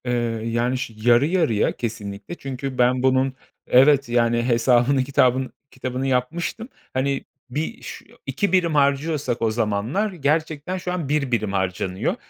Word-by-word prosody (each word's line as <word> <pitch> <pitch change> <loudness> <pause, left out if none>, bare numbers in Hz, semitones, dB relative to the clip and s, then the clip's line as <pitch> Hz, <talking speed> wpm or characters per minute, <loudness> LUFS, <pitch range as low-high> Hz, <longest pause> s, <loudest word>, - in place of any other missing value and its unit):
Eee, 125 - -1 0.3
yani, 120 +2 0
şi 115 -3 -5
yarı 120 +3 +6
yarıya 160 - +1
kesinlikle. 105 +3 -6
Çünkü 135 -3 -6
ben 125 +1 +2
bunun 130 0 +2 0.3
Evet, 140 +1 +5
yani, 120 0 +2
hesabını 125 +2 +3
kitabın 130 -1 +1 0.2
kitabını 130 0 -3
yapmıştım. 165 - -2 0.2
Hani, 135 +1 -1 0.2
bir 155 - -4
ş - - -9 0.2
2 200 -4 -1
birim 175 -4 +2
harcıyorsak 140 -2 +1
o 115 -1 +2
zamanlar 115 - -1
gerçekten 155 +2 -1
şu 180 0 -4
an 170 -6 -3
1 145 -3 0
birim 110 -4 0
harcanıyor 95 -1 -1
130 Hz, 140 wpm, -22 LUFS, 120-150 Hz, 0.3 s, yarı